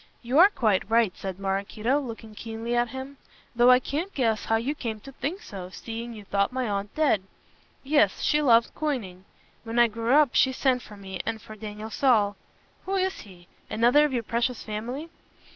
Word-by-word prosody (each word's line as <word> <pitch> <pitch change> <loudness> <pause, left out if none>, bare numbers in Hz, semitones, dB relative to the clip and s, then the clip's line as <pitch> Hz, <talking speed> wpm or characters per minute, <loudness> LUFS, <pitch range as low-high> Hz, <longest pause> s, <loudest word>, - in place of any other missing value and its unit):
"You 250 +6 +2
are 380 +3 +9
quite 215 - +1
right," 225 -4 +3
said 190 -2 -6
Maraquito, 200 +7 -1
looking 225 -5 -8
keenly 225 +2 -4
at 240 0 +2
him, 265 +3 -7 0.4
"though 240 +1 +5
I 250 0 +7
can't 310 +9 -3
guess 225 -5 +1
how 225 - +2
you 235 +6 0
came 230 -7 -5
to 275 - -11
think 315 +8 -4
so, 185 -3 -8
seeing 230 +4 -7
you 210 - -10
thought 200 +2 +1
my 255 -1 -2
aunt 200 0 -3
dead. 300 -10 +3 0.6
Yes, 300 +2 +2
she 300 0 +3
loved 235 -5 +4
coining. 215 -12 -3 0.4
When 230 0 -5
I 240 - +7
grew 230 +3 0
up 295 -4 +5
she 260 - +4
sent 255 -1 +1
for 210 -3 -12
me 190 -2 -6
and 225 0 -3
for 215 0 -11
Daniel 215 0 -7
Saul 215 -6 +3 0.2
" - - -35
"Who 390 - 0
is 380 0 0
he? 180 -3 -14 0.2
Another 240 +6 +4
of 300 - +1
your 240 -3 -1
precious 235 +2 -1
family." 245 +9 -5
235 Hz, 195 wpm, -26 LUFS, 210-270 Hz, 0.6 s, are